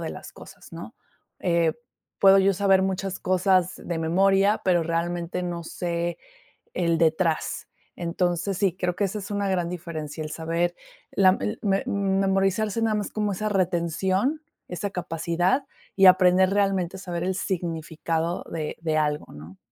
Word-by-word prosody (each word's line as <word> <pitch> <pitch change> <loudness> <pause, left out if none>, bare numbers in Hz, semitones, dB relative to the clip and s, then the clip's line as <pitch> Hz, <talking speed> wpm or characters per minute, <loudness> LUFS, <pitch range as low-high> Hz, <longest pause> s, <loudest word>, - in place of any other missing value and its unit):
de - - -4
las - - -10
cosas, - - -14
¿no?, - - -9 0.4
eh, 170 -2 +2 0.5
puedo 195 0 +7
yo 195 0 +3
saber 195 0 +3
muchas 190 0 -2
cosas 185 -1 +2
de 170 -2 -5
memoria, 195 +5 +3
pero 175 -3 +3
realmente 170 +2 -2
no 175 -1 -4
sé 170 0 -3 0.6
el 170 -2 +1
detrás, 165 0 0 0.3
entonces 175 +2 -1
sí, 190 -3 +1
creo 180 -1 -1
que 205 - -1
esa 200 +2 -1
es 205 +1 -8
una 200 -1 -1
gran 175 -2 0
diferencia, 160 -3 -6
el 155 - -6
saber 165 +2 -1 0.4
la 190 -1 +4
el 215 +2 -2
me 195 -1 +1
memorizarse 195 +2 +1
nada 220 -1 +1
más 205 -1 -2
como 210 -1 -1
esa 215 +3 -2
retención, 190 - 0 0.3
esa 195 +3 -4
capacidad 175 - -1 0.3
y 195 -1 +5
aprender 185 0 +6
realmente, 195 -2 0
saber 175 -2 -4
el 190 +1 0
significado 165 -2 -2
de 155 -2 -4
de 160 -2 -1
algo, 150 -1 0
¿no? 80 +5 -12
180 Hz, 150 wpm, -25 LUFS, 170-195 Hz, 0.6 s, puedo